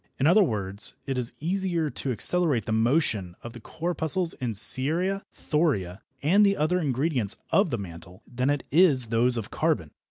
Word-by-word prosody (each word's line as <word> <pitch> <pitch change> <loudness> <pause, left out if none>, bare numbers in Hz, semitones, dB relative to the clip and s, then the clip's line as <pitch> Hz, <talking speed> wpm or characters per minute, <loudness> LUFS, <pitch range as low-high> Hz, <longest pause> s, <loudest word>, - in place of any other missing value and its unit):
In 135 - -1
other 180 +7 +5
words, 100 - -2
it 135 - -3
is 125 -2 -2
easier 175 -2 -2
to 135 - -4
accelerate 145 - +2
the - - -5
motion 110 - 0
of 120 - -9
the 120 - -11
corpuscles 165 +4 0
in 120 -3 -5
ceria, 160 - +4
thoria 110 - -2 0.2
and 190 +8 +3
the 200 -1 +2
other 165 +4 0
ingredients 135 - 0 0.2
of 195 -2 +2
the 120 - -3
mantle, 90 -2 -11
than 125 +2 -3
it 145 -1 -1
is 145 -7 +3
those 120 +2 +1
of 110 - -6
carbon. - - -2
135 Hz, 170 wpm, -25 LUFS, 115-170 Hz, 0.2 s, other